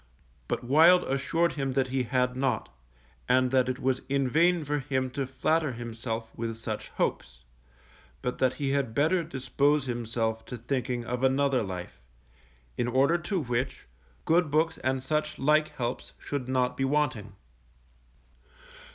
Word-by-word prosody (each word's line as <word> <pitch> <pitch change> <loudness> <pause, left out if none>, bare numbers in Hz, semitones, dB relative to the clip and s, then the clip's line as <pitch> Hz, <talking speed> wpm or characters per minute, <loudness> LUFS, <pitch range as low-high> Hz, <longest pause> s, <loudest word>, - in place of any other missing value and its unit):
But - - -2
Wild 160 +8 +6
assured 155 +6 0
him 135 -3 -2
that 130 -1 +1
he 130 0 0
had 125 0 0
not, 130 -3 -1 0.6
and 130 0 +3
that 130 -1 +3
it 130 - -2
was 130 0 0
in 140 -1 +1
vain 170 +4 +3
for 145 +1 0
him 130 -2 -1
to 135 0 -3
flatter 140 +3 0
himself 115 -1 -5
with 115 0 -3
such 110 -2 -5
hopes, 60 0 -3 0.8
but 125 - -2
that 130 -1 +2
he 140 -2 -1
had 135 -5 -1
better 165 +6 +2
dispose 140 0 +1
himself 115 -2 -2
to 125 - -6
thinking 120 0 -2
of 125 +2 -3
another 135 0 +3
life; 90 - -6 0.8
in 120 - +1
order 135 +7 +3
to 175 +2 -1
which, 125 +2 -2 0.4
good 165 -1 +3
books 155 +3 +1
and 130 0 -1
such 150 +2 -1
like 150 +2 +3
helps 120 -1 -4
should 135 -3 -4
not 125 -1 +1
be 135 - -1
wanting. 130 -8 0
130 Hz, 150 wpm, -28 LUFS, 125-145 Hz, 0.8 s, Wild